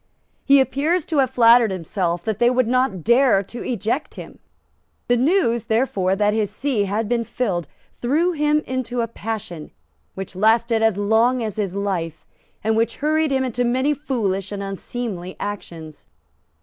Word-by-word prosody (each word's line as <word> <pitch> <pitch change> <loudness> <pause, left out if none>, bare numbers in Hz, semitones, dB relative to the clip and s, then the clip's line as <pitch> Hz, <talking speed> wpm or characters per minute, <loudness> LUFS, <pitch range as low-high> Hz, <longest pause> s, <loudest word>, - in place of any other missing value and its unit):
He 280 0 +6
appears 295 +6 +1
to 315 - -2
have 265 -2 +3
flattered 235 -1 +5
himself 175 -1 -2
that 220 -2 -2
they 240 - +5
would 255 -1 +1
not 255 -8 0
dare 235 -3 +4
to 235 +5 -8
eject 240 +5 -2
him. - - -10 0.7
The 245 - +3
news, 245 - +2
therefore, 220 -5 +1
that 205 +1 +1
his 215 -2 0
see 215 0 -1
had 210 +3 -2
been 235 +1 0
filled 190 - -2 0.3
threw 310 +9 +1
him 300 -2 +1
into 250 -2 -2
a 230 - -1
passion 210 -8 -6 0.5
which 190 -1 -7
lasted 225 +3 +2
as 225 -3 +2
long 225 +4 +2
as 215 -2 -4
his 195 -3 -2
life, 180 -5 -3 0.4
and 220 +1 +1
which 225 +1 0
hurried 310 +1 +1
him 265 -1 +1
into 245 -1 -1
many 260 +4 +1
foolish 210 - -2
and 200 -1 -4
unseemly 195 -2 -5
actions. 165 -6 -7
230 Hz, 160 wpm, -21 LUFS, 200-255 Hz, 0.7 s, He